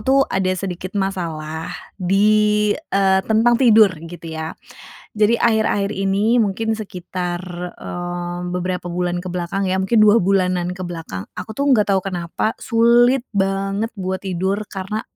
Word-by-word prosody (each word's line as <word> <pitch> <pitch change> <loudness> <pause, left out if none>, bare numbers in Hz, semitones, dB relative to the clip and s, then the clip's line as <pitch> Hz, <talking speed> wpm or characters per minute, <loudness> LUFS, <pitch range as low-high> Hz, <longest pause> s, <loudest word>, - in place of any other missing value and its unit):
tuh 265 +5 +3
ada 190 -1 0
sedikit 185 0 -5
masalah 165 -5 -3 0.3
di 210 +2 +3
eee, 195 -10 +1
tentang 225 +2 +4
tidur, 220 -5 +6 0.2
gitu 170 -1 -11
ya. 160 0 -5 0.6
Jadi, 215 +2 +3
akhir-akhir 220 -3 +2
ini 195 +4 +1
mungkin 220 0 0
sekitar 180 -4 -5 0.4
eee, 175 0 -5
beberapa 180 0 -3
bulan 175 0 -2
ke 180 - -5
belakang 180 +2 -2
ya, 190 - +1
mungkin 190 +5 +1
2 215 +2 +6
bulanan 180 -2 +1
ke 185 - -6
belakang. 165 - -6
Aku 220 - -7
tuh 280 - -1
enggak 210 -5 +3
tahu 190 - 0
kenapa, 180 +3 -2
sulit 240 +2 +4
banget 195 +2 0
buat 190 -1 -3
tidur, 190 +2 -1
karena 195 +3 -4
195 Hz, 140 wpm, -20 LUFS, 180-215 Hz, 0.6 s, tidur